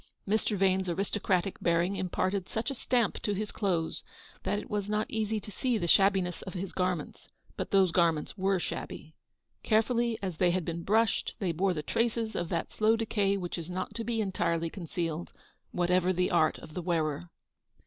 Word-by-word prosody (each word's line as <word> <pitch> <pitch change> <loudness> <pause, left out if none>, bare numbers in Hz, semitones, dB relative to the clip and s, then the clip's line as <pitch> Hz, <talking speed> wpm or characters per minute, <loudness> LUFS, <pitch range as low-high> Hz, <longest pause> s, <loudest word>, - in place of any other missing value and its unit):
Mr. 210 0 +1
Vane's 190 -1 +2
aristocratic 190 0 0
bearing 170 +3 +2
imparted 185 0 -1
such 225 +5 -2
a - - -2
stamp 240 -3 0
to 205 - 0
his 210 +1 -3
clothes, 175 -6 -1 0.4
that - - 0
it - - -5
was 205 -1 -2
not 215 0 +1
easy 220 0 0
to 210 - -10
see 245 +4 0
the 175 - -1
shabbiness 190 -1 +3
of 190 - -8
his 185 0 -4
garments; 180 -4 -2 0.3
but - - -3
those 190 -3 +4
gar 170 -1 +5
ments 150 -2 -5
were 195 -1 +2
shabby. 160 -2 -5 0.5
Carefully 230 +1 +2
as 185 -5 -4
they 180 +1 +4
had 175 -1 0
been 170 0 -3
brushed, 220 +5 +2
they 185 -4 0
bore 180 +3 +1
the 150 - -3
traces 230 +3 0
of 175 -1 -2
that 170 - -2
slow 220 +1 +3
decay 205 -3 +1
which 175 -2 -4
is 165 +1 -6
not 185 +1 -3
to 230 - -3
be 225 0 -1
entirely 170 -4 0
concealed, 170 -2 -4 0.4
whatever 180 +1 +2
the 180 0 +1
art 160 -3 +3
of 155 - -12
the 180 - -3
wearer. 165 -1 -1
185 Hz, 190 wpm, -30 LUFS, 175-210 Hz, 0.5 s, gar